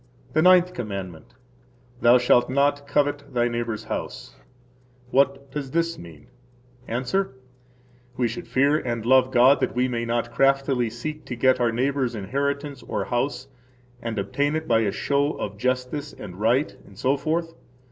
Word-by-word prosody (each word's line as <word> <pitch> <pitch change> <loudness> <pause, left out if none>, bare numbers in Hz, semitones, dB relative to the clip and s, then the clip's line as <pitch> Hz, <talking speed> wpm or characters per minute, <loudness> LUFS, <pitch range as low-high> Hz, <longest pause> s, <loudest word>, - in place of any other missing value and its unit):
The 155 - +3
Ninth 180 +1 +5
Commandment. 95 -7 -6 0.7
Thou 120 +1 +7
shalt 125 0 +3
not 140 +1 +1
covet 145 0 +1
thy 120 0 +3
neighbor's 120 -2 -3
house. - - -6 0.8
What 140 0 +1
does 145 -3 -4
this 165 +3 -1
mean? 80 -4 -12 0.6
–Answer: 130 +7 -1 0.8
We 125 - +2
should 115 - -6
fear 140 +3 +3
and 120 -3 -3
love 130 +1 +5
God 130 +2 +5
that - - -1
we 125 +1 +2
may 120 -2 -2
not 120 0 -1
craftily 135 -1 +2
seek 150 +7 -6
to 125 - -5
get 130 +2 +3
our 120 -1 +2
neighbor's 130 0 0
inheritance 140 +6 -3
or - - -3
house, 130 +1 -2 0.5
and 115 -2 -4
obtain 145 +9 0
it 160 0 -3
by 115 - +4
a 105 -3 +1
show 140 +5 0
of 100 - -5
[justice 130 +4 -2
and] 90 -1 -10
right, 120 +7 +1
etc. 150 +5 0
130 Hz, 150 wpm, -24 LUFS, 120-145 Hz, 0.8 s, Thou